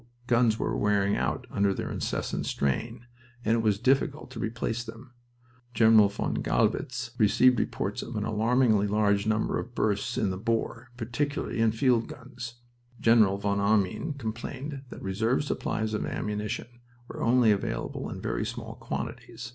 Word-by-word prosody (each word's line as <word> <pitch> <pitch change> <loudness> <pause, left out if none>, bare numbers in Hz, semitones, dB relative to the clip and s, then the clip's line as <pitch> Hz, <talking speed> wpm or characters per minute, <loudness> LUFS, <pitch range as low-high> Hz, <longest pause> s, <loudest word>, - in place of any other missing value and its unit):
Guns 120 -3 +3
were - - -1
wearing 100 -1 +2
out - - -1
under 100 -1 +2
this - - -3
incessant - - -2
strain, 115 - -2 0.4
and 110 - +3
it 115 - +2
was 105 -3 +2
difficult 135 +4 +1
to 120 - -7
replace 115 +1 -2
them. 115 +3 -11 0.6
General 110 -2 +6
von 100 - -2
Gallwitz 125 -1 0
received 125 +3 +5
reports - - -2
of - - -7
"an - - -1
alarmingly 110 -1 +2
large 100 0 +2
number 110 0 +1
of 120 +1 -8
bursts 110 +4 0
in 95 - +1
the 95 - -4
bore, 115 +2 -2
particularly 125 +3 -2
in 115 -1 +4
field 115 0 +2
guns." 125 -5 -9 0.4
General 110 -4 +5
von 100 0 0
Arnim 100 - +1
complained 135 +3 -5
that - - -9
"reserve 110 +8 +1
supplies 110 -6 -2
of 105 - -1
ammunition 105 +3 -4 0.3
were - - -7
only 120 -1 +4
available 100 - -2
in - - -6
very - - -2
small - - -5
quantities." 120 +1 -6
115 Hz, 155 wpm, -28 LUFS, 105-125 Hz, 0.6 s, General